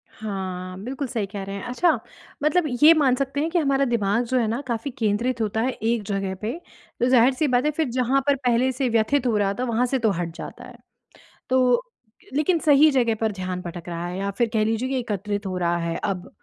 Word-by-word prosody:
हाँ, 185 -3 -5
बिल्कुल 270 +4 -4
सही 230 -4 -2
कह 200 0 -6
रहे 195 +1 -6
हैं। 200 - -6
अच्छा! 250 +8 +2 0.4
मतलब 310 +4 +3 0.2
ये 315 +2 +10
मान 280 -6 +3
सकते 275 +1 -2
हैं 320 - 0
कि 350 - +2
हमारा 275 -3 +2
दिमाग 230 -2 +1
जो 255 +2 0
है 230 - +1
ना 230 +5 -2
काफ़ी 235 +3 -3
केंद्रित 235 0 -1
होता 220 0 0
है 255 +3 +1
एक 230 -2 -1
जगह 195 -2 -2
पे, 220 +2 -2 0.5
तो - - +2
ज़ाहिर-सी 255 +4 +4
बात 250 0 +2
है 300 - +2
फिर 305 -2 -1
जहाँ 255 +2 +1
पर 285 - +4
पहले 255 -1 +1
से 260 0 -1
व्यथित 235 +4 +2
हो 230 - +1
रहा 200 -1 +1
था - - 0
वहाँ 240 0 +1
से 265 +1 0
तो 220 -3 +2
हट 170 -1 -3
जाता - - -8
है। - - -13 0.7
तो 255 - +3 0.5
लेकिन 310 +4 +2
सही 300 0 +6
जगह 240 -4 +2
पर 220 -1 +1
ध्यान 185 -2 -4
भटक 175 -1 -8
रहा 170 0 -4
है 180 +1 -5
या 200 +1 -1
फिर 230 +4 0
कह 215 -1 +2
लीजिए 225 +4 -1
कि 265 -1 0
एकत्रित 205 -2 -3
हो 185 -1 -3
रहा 175 -1 +1
है 170 -1 -2
अब 185 -2 -3
235 Hz, 230 wpm, -24 LUFS, 200-265 Hz, 0.7 s, ये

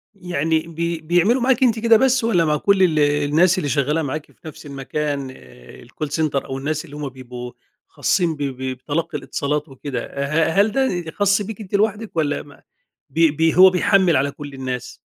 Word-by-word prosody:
يعني 165 -4 -1
بي 170 0 -3
بيعملوا 175 +10 +2
معاكِ 260 +1 +2
أنتِ 230 -3 +3
كده 230 0 +5
بس 260 0 +2
والّا 180 -8 +2
مع 150 -1 +1
كل 195 +3 +3
ال 155 -4 +2
الناس 150 +5 +3
اللي 145 -6 -1
شغالة 150 +4 +1
معاكِ 150 +1 -4
في 160 - -15
نفس 150 - -10
المكان 140 0 -4 0.6
الcall 155 - -5
center 150 -2 -1
أو 135 - -5
الناس 155 +2 -3
اللي 145 - -12
هم 145 -2 -4
بيبقوا 125 -1 -9 0.4
خاصين 165 +1 0
ب 145 - -10
ب 135 -2 -4 0.2
بتلقي 150 +3 -3
الاتصالات 145 +2 -3
وكده؟ 135 -1 -5
آآ، 140 - -4 0.3
ه 195 - +4
هل 210 +1 +1
ده 180 -11 -1
خاص 200 +2 +2
بيك 220 +1 -6
أنت 200 0 -4
لوحدِك 210 -1 0
والّا 145 -2 0
ما 145 - -17 0.5
بي 160 +2 +3
بي 160 +2 +1
هو 190 0 +9
بيحمل 185 -2 +3
على 140 +1 0
كل 145 -1 -9
الناس؟ 130 -2 -5
155 Hz, 190 wpm, -21 LUFS, 145-185 Hz, 0.6 s, هو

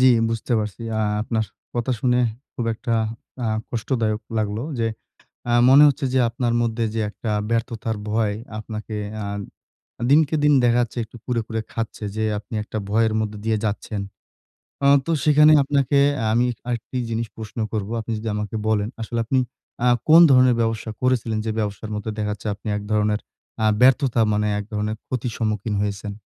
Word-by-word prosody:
জি, - - +5 0.2
বুঝতে 115 +2 -2
পারছি। 105 +2 -4 0.2
আ - - +1 0.2
আপনার 110 0 -1 0.3
কথা 120 +2 0
শুনে 125 0 +2 0.4
খুব 120 - -3
একটা 115 +1 -2 0.5
আ - - 0 0.2
কষ্টদায়ক 110 -2 -1 0.2
লাগলো। 105 +1 -1 0.2
যে 115 - +1 0.6
আ - - +2 0.2
মনে 140 +3 +8
হচ্ছে 140 -1 -1
যে - - +4
আপনার 120 0 -1
মধ্যে 115 0 0
যে 115 - 0
একটা 110 +1 -5 0.2
ব্যর্থতার 115 -1 -1
ভয়, 105 -1 +1 0.2
আপনাকে 110 0 -6 0.3
আ - - -4 0.9
দিনকে 155 +1 +4
দিন 150 - +5
দেখা 120 0 +4
যাচ্ছে 120 +1 -5
একটু 110 - -15
কুরে, 120 -2 0
কুরে 110 -1 -2
খাচ্ছে 115 -1 -4
যে 110 - 0
আপনি 105 +2 -10
একটা 110 - -5
ভয়ের 110 0 +3
মধ্যে 105 -1 -3
দিয়ে 110 -1 +1
যাচ্ছেন। 105 0 -2 0.8
অ - - +5 0.2
তো 165 - -1
সেখানে 150 0 +7
আপনাকে 140 0 +1 0.2
আ - - -1
আমি 120 +2 +3 0.2
আরেকটি 120 +1 -3
জিনিস 115 0 -2
প্রশ্ন 110 +1 -7
করব। 105 -1 -2
আপনি 115 +1 -6
যদি 110 +1 -4
আমাকে 105 +1 -4
বলেন, 105 0 +1
আসলে 115 +1 -3
আপনি 130 +3 +2 0.5
আ - - +5 0.2
কোন 165 +2 +9
ধরনের 125 -2 +6
ব্যবসা 115 0 -1
করেছিলেন? 120 -4 +1
যে 110 - 0
ব্যবসার 105 +1 -3
মধ্যে 105 +1 -3
দেখা 105 -1 -1
যাচ্ছে 105 - -8
আপনি 105 - -11
এক 105 - -6
ধরনের 105 0 +2 0.4
আ - - +3 0.2
ব্যর্থতা 130 -2 +4
মানে 105 0 +1
এক - - -4
ধরনের 105 +1 -1
ক্ষতির 125 -2 -3
সম্মুখীন 110 -1 -1
হয়েছেন? 100 0 -3
115 Hz, 175 wpm, -22 LUFS, 105-120 Hz, 0.9 s, কোন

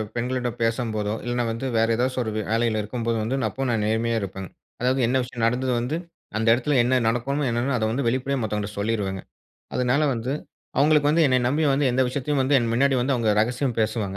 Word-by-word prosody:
பெண்களிடம் 125 0 -2
பேசம்போதோ, 115 -3 -1
இல்லனா 120 0 0
வந்து 115 +4 -4
வேற 115 0 +3
ஏதாச்சும் 130 +2 0
ஒரு 110 - -3
வேலையில 110 +1 0
இருக்கும்போது 115 +2 -2
வந்து 120 +5 -1
அப்போவும் 135 +5 -3
நான் 110 -2 0
நேர்மையா 115 +1 0
இருப்பன்ங்க. 95 -1 -6 0.3
அதாவது 130 +2 +1
என்ன 130 +3 +2
விஷயம் 120 -2 -2
நடந்துது 125 +2 0
வந்து 125 +6 -2 0.4
அந்த 110 +1 -1
இடத்துல 130 +5 0
என்ன 130 +2 +2
நடக்குமோ 135 +5 0
என்னனா 120 +3 0
அத 110 - 0
வந்து 135 +5 -1
வெளிப்படையா 130 +3 0
மத்தவங்க 105 -2 -2
கிட்ட 105 - -11
சொல்லீருவேங்க. 100 -3 -1 0.5
அதனால 125 +4 +2
வந்து 120 +3 -3 0.5
அவங்களுக்கு 145 0 +4
வந்து 160 +3 +3
என்னைய 130 -2 +3
நம்பி 145 +5 +1
வந்து 140 +2 +2
எந்த 130 +2 +2
விஷயத்தையும் 140 +2 -1
வந்து 135 +2 +1
என் 120 -2 -1
முன்னாடி 135 +3 +3
வந்து 130 +3 +1
அவங்க 115 -3 +1
ரகசியம் 125 +3 0
பேசுவாங்க 105 -3 -1
120 Hz, 195 wpm, -24 LUFS, 115-130 Hz, 0.5 s, அவங்களுக்கு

